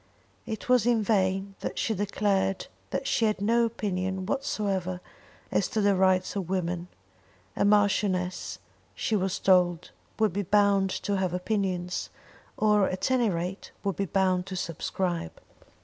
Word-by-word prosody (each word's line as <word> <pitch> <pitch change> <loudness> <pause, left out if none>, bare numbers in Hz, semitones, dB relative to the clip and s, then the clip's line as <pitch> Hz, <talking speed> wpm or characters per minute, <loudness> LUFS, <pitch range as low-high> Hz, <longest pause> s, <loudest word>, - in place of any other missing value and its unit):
It 220 -2 -5
was 250 -3 +4
in 235 -3 +3
vain 195 -1 +1
that - - -5
she 225 - 0
declared 200 -1 0 0.2
that - - -3
she 230 - +2
had 215 -2 +1
no 230 +3 +3
opinion 190 -4 -2
whatsoever 195 -8 -1 0.5
as - - +2
to 220 - -2
the 200 -1 +3
rights 185 0 +2
of 190 -4 -3
women; 175 -2 -2 0.7
a - - +1
marchioness 200 -3 +1 0.4
she 220 - 0
was 190 -2 0
told 180 -3 +3 0.3
would 215 -4 +2
be 200 - 0
bound 200 0 +3
to 200 +1 -2
have 185 -2 0
opinions, 180 -2 -2 0.5
or, 210 -2 +3
at 185 +7 -2
any 245 -4 +3
rate, 180 +2 -3
would 200 -2 -1
be 200 - -1
bound 185 -1 +1
to 190 - -5
subscribe. 175 - -3
195 Hz, 150 wpm, -28 LUFS, 185-210 Hz, 0.7 s, was